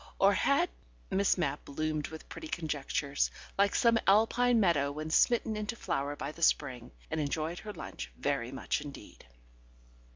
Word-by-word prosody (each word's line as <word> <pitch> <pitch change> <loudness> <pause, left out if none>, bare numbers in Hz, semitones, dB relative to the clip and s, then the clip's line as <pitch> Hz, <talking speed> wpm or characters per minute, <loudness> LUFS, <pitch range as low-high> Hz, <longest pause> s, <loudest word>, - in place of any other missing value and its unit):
Or - - +5
had... - - +2 0.4
Miss 195 0 +3
Mapp 145 -5 -1
bloomed 155 +1 -2
with 160 0 -10
pretty 320 - -8
conjectures, 145 - -1 0.3
like 200 0 +3
some 230 -2 +4
Alpine 225 +4 +4
meadow 155 -8 +3
when 155 +2 -5
smitten 230 +3 +3
into 215 +2 -3
flower 140 -8 -2
by 145 - -4
the 170 - -14
spring, 130 -7 +1 0.2
and 160 -1 0
enjoyed 155 +4 -2
her 215 - -7
lunch - - -7
very - - -1
much - - -2
indeed. - - -11
160 Hz, 155 wpm, -31 LUFS, 145-210 Hz, 0.4 s, Or